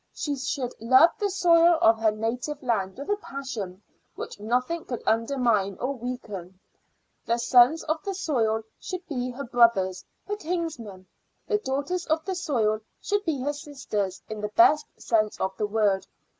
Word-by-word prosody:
She 290 -2 -2
should 260 -2 -3
love 260 +8 +6
the 410 - +1
soil 340 -3 +5
of 225 0 +5
her 225 -1 +4
native 245 +7 -3
land 195 -6 -1
with 280 - -7
a 410 - +2
passion 230 - -6 0.3
which - - -7
nothing 250 +10 -1
could 245 - -5
undermine 225 -4 +1
or 260 +3 -1
weaken. 210 -8 -7 0.7
The 235 - +2
sons 250 +6 +5
of 315 +1 -1
the 395 -1 -3
soil 225 - 0 0.2
should 365 -1 -6
be 255 -5 -2
her 255 +3 -6
brothers, 230 -7 +3 0.2
her 415 +1 -2
kinsmen; 310 - -4 0.4
the 420 -2 +1
daughters 340 +2 -2
of 315 0 0
the 385 - -2
soil 240 - 0 0.2
should 410 0 -1
be 300 -6 -1
her 290 +3 -1
sisters 215 -10 -4
in 215 -1 -6
the 210 - -1
best 330 -3 +5
sense 215 -2 +1
of 190 0 -1
the 210 - 0
word. 205 -2 +1
250 Hz, 165 wpm, -26 LUFS, 220-315 Hz, 0.7 s, love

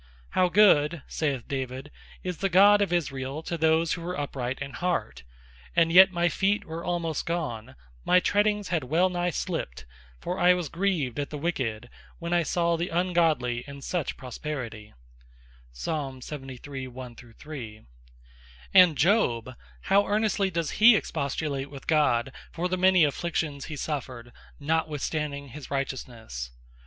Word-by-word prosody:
"How 180 -1 +2
Good," 170 -6 +4
saith 140 -6 -2
David, 135 +1 -4 0.3
"is 180 -2 -3
the 195 - 0
God 200 +3 +6
of 200 - +1
Israel 140 -3 -2
to 170 - -3
those 160 0 +2
that 180 - -5
are 180 +2 -4
Upright 135 -3 -3
in 140 -1 -5
Heart; 180 0 -2 0.5
and 165 -1 +4
yet 190 +2 +8
my 175 -1 +1
feet 195 +4 0
were 165 +1 -6
almost 170 -3 -2
gone, 130 -8 -3 0.3
my 180 - +5
treadings 205 0 +1
had 165 -6 -1
well 170 +8 +2
nigh 175 -1 -1
slipt; 160 - -4 0.3
for 180 - -4
I 180 0 +6
was 175 -5 -3
grieved 165 -9 -1
at 145 - -2
the 150 - -5
Wicked, 125 -8 -2 0.3
when 170 +1 -4
I 175 - +4
saw 170 +1 +1
the 170 +2 -2
Ungodly 165 -9 +1
in 140 0 -9
such 175 -1 -2
Prosperity." 125 -5 -6 0.9
And 135 -5 -3 2.7
Job, 130 - +2 0.3
how 200 +1 +3
earnestly 205 -1 +1
does 170 -3 -2
he 225 +1 +7
expostulate 140 -5 -2
with 140 -1 -11
God, 135 -5 +2 0.2
for 175 +2 -2
the 185 - -1
many 185 -1 +5
Afflictions 150 -1 -1
he 155 - -6
suffered, 130 -5 -5 0.3
notwithstanding 150 -2 -2
his 145 +2 -10
Righteousnesse? 120 - -4
160 Hz, 140 wpm, -27 LUFS, 135-180 Hz, 2.7 s, yet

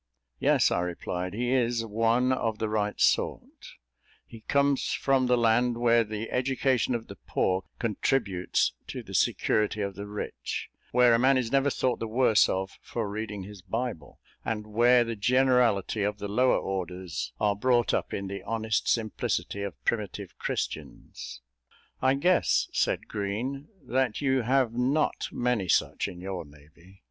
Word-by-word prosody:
"Yes," - - +3
I - - +1
replied, 90 +1 -3
"he 120 +2 -1
is 120 -3 +1
one 115 +4 +2
of 115 -4 -1
the 110 - -1
right 105 -1 -1
sort - - 0 0.5
he 115 - -12
comes 140 +2 +1
from 135 -2 +2
the 125 0 +3
land 120 +1 +2
where 120 -1 +4
the 110 +1 -5
education 130 -1 +1
of 115 -1 -4
the - - -11
poor 95 0 0
contributes 105 -4 0
to - - -6
the - - -11
security 105 0 +1
of 100 -1 -2
the 100 +2 -7
rich; 105 0 -5 0.2
where 125 -1 +5
a 115 - +4
man 130 +2 +4
is 125 -3 -1
never 135 +1 +3
thought 130 -2 0
the 115 - -3
worse 110 -1 +4
of 95 +1 -3
for 115 -3 -4
reading 105 -1 -5
his 100 0 -11
Bible, 110 -2 -4 0.3
and 105 -2 -3
where 120 +3 +4
the 115 -1 -4
generality 125 -3 +2
of 105 +1 -1
the 105 - -5
lower 125 +5 +3
orders 90 -7 -4
are 105 -1 +2
brought 120 +2 +2
up - - -1
in 100 - -3
the 100 +1 -5
honest 110 -1 -1
simplicity 110 -2 -1
of 100 -2 -6
primitive 100 -5 -2
Christians." - - -5 0.6
"I 130 +1 +3
guess," 175 +6 +2
said - - 0
Green, 120 +8 -3 0.2
"that 125 -2 0
you 130 -2 +2
have 125 0 +2
not 130 +6 0
many 120 -6 0
such - - +1
in 90 -3 -8
your 95 -1 -4
navy." 80 +6 -19
115 Hz, 160 wpm, -28 LUFS, 100-125 Hz, 0.6 s, where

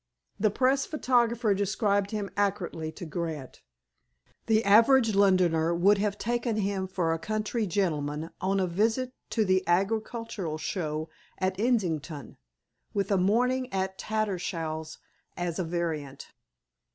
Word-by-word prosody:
The 215 +1 +3
press 265 +5 +2
photographer 240 -6 +2
described 200 0 +1
him 205 -2 -3
accurately 190 -6 -1
to 180 - -8
Grant. 155 -4 -5 0.9
The 220 -1 +3
average 225 +3 +6
Londoner 180 -4 +3
would 195 +4 +4
have 205 0 0
taken 240 0 -1
him 195 -2 -1
for 180 -3 0
a 165 - -3
county 215 +4 -2
gentleman 160 -4 -1
on 195 +1 +1
a 190 - +2
visit 225 +8 0 0.2
to 220 -3 +1
the 185 -1 +2
Agricultural 205 -1 -1
Show 155 -2 -3 0.3
at 185 0 -1
Islington, 170 - -1 0.6
with 200 0 0
a 200 - +4
morning 250 +7 +1
at 190 0 -2
Tattersall's 170 -7 -3 0.4
as 175 -1 -2
a - - +1
variant. 160 -5 -4
195 Hz, 130 wpm, -28 LUFS, 170-220 Hz, 0.9 s, average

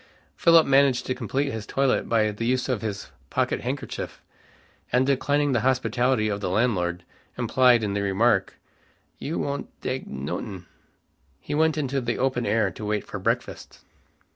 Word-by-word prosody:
Philip 165 -1 +6
managed 135 -2 +3
to 130 - -1
complete 135 +3 -2
his 110 -3 -6
toilet 135 -1 +1
by 110 -2 +2
the 115 +3 -3
use 130 0 +1
of 125 -5 -1
his 105 -3 -5 0.2
pocket - - 0
handkerchief, - - -5 0.7
and 125 +2 +3
declining 145 +1 +1
the 120 - +2
hospitality 125 -2 +1
of 100 -1 -2
the 100 - -1
landlord, 90 -5 0 0.3
implied 120 0 +4
in 100 -2 -1
the 100 - -1
remark, 100 0 +2 0.6
"You 160 - -3
won'd 140 0 -3
dake 130 +1 -4
notin'?" 95 -3 -5 0.7
he - - -6
went 160 +1 +2
into 135 -2 -1
the 120 -1 -2
open 130 -2 0
air 105 -2 +2
to 105 - -9
wait 105 0 -1
for - - -6
breakfast. - - -3
120 Hz, 160 wpm, -25 LUFS, 105-135 Hz, 0.7 s, Philip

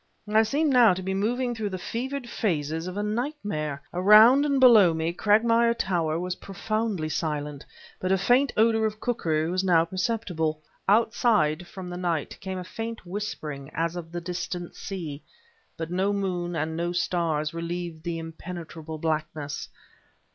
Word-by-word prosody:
I 215 +1 +4
seemed 285 +6 +1
now 235 -7 +6
to 185 - -5
be 190 +1 -2
moving 240 +5 0
through 220 -3 -3
the 190 - -4
fevered 250 +7 -4
phases 160 -6 -1
of 185 +2 -5
a 205 - -1
nightmare. 210 - -3
Around 215 +10 +7
and 280 -2 +2
below 215 -10 +7
me 160 +1 -1
Cragmire 230 +4 +3
Tower 170 -6 0
was 180 +1 -3
profoundly 205 -3 -2
silent, 150 -2 -3 0.3
but 185 - -1
a 190 - +4
faint 250 +7 +3
odor 220 0 +4
of 215 0 -6
cookery 160 -11 0
was 185 +1 0
now 170 -3 +4
perceptible. 180 -4 -1 0.3
Outside, 205 -7 +3
from 185 -2 -8
the 175 - -5
night, 170 -4 -2
came 190 -1 -5
a 180 - -4
faint 225 +4 -6
whispering 155 -8 -5
as 165 +2 -1
of 165 -2 -7
the 175 0 -4
distant 175 0 -5
sea, 160 -7 -6 0.6
but 165 +1 -5
no 190 +3 +1
moon 180 -3 -2
and 160 +1 -2
no 170 +1 -1
stars 165 -4 0
relieved 170 -1 -4
the 170 -1 -3
impenetrable 165 -1 -7
blackness. 155 -2 -3
180 Hz, 160 wpm, -26 LUFS, 160-220 Hz, 0.6 s, Around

